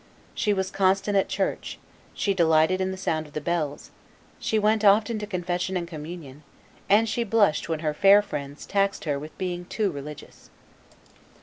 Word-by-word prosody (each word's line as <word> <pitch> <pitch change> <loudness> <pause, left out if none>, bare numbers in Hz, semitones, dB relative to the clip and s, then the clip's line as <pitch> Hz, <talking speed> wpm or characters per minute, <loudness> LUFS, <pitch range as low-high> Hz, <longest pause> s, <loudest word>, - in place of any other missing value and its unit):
She 210 - 0
was 190 -1 -1
constant 195 +1 +1
at 195 - +2
church, - - -2 0.4
she 200 - 0
delighted 165 +1 +3
in 190 - 0
the 190 - -5
sound 160 -4 -2
of 145 - -18
the - - -2
bells, 155 -2 -3 0.5
she 220 - 0
went 215 +1 +2
often 210 +2 +4
to 210 - -5
confession 180 -1 -2
and 170 -1 -4
communion, 155 -3 -9 0.5
and 215 +3 +5
she 235 +2 -1
blushed 205 -9 +2
when 160 -1 -2
her 155 -2 -1
fair 195 +6 +6
friends 140 -7 -6
taxed 200 0 0
her 145 -2 -1
with 150 +2 -10
being 180 -1 -3
too 205 +1 -1
religious. 145 0 -10
185 Hz, 175 wpm, -25 LUFS, 155-200 Hz, 0.5 s, fair